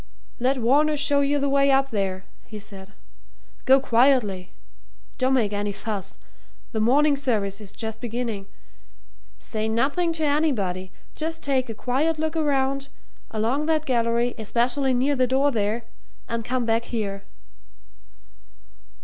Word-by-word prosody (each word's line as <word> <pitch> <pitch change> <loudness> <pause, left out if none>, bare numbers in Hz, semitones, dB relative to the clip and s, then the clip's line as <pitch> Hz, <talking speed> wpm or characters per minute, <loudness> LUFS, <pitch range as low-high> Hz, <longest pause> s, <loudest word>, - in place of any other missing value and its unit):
"Let 260 +3 +1
Varner 290 +6 +3
show 285 -1 +4
you 285 +1 +2
the 280 0 0
way 275 0 +3
up 270 0 +3
there," 190 -3 -2 0.2
he 215 - -9
said. 200 -1 -9 0.7
"Go 265 +1 +6
quietly 235 -7 +2 0.7
don't 260 +1 +3
make 215 -5 +1
any 205 0 -1
fuss 205 -1 -5 0.5
the 220 - -2
morning 280 +7 +4
service 215 -7 -1
is 205 - -7
just 220 -1 -6
beginning. 230 -4 -4 0.9
Say 220 0 -3
nothing 280 +10 +1
to 320 -1 -2
anybody 220 - 0 0.2
just 325 +1 -4
take 265 -3 0
a 225 - -5
quiet 285 +8 0
look 315 +1 -2
around, 275 -3 0 0.4
along 235 +8 -1
that 310 -1 +1
gallery, 235 -1 +1
especially 250 +4 +1
near 270 +4 +2
the 255 -1 +2
door 270 +3 +2
there 220 0 -1 0.4
and 230 0 -3
come 250 +1 -1
back 225 +1 +1
here." 200 -4 -3
250 Hz, 140 wpm, -24 LUFS, 220-280 Hz, 0.9 s, Go